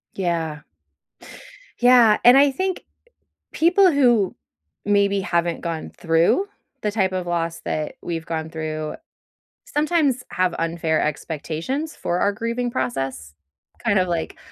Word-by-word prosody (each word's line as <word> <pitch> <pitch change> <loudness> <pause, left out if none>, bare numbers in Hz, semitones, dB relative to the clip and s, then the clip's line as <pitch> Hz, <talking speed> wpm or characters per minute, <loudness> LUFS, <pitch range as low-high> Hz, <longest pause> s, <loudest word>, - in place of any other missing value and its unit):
Yeah. 165 -5 -2 1.2
Yeah, 245 -3 +6
and 245 +2 +8
I 280 0 +5
think 375 +7 -3 0.7
people 360 +3 +4
who 240 - +3 0.5
maybe 200 -1 +2
haven't 170 -3 -1
gone 165 -2 -4
through 165 - +2 0.3
the 210 - -1
type 195 -3 +1
of 185 -1 -3
loss 170 -1 -2
that 155 -1 -3
we've 165 -2 -4
gone 160 -1 -4
through 155 -1 -4 0.7
sometimes 295 -4 +1
have 185 -1 +1
unfair 165 -1 0
expectations 165 - -3
for 175 - -2
our 200 - +2
grieving 230 +4 -2
process. 130 - -3 0.5
Kind 215 -4 +2
of 185 - +1
like, 170 -2 -3
185 Hz, 125 wpm, -22 LUFS, 165-245 Hz, 1.2 s, and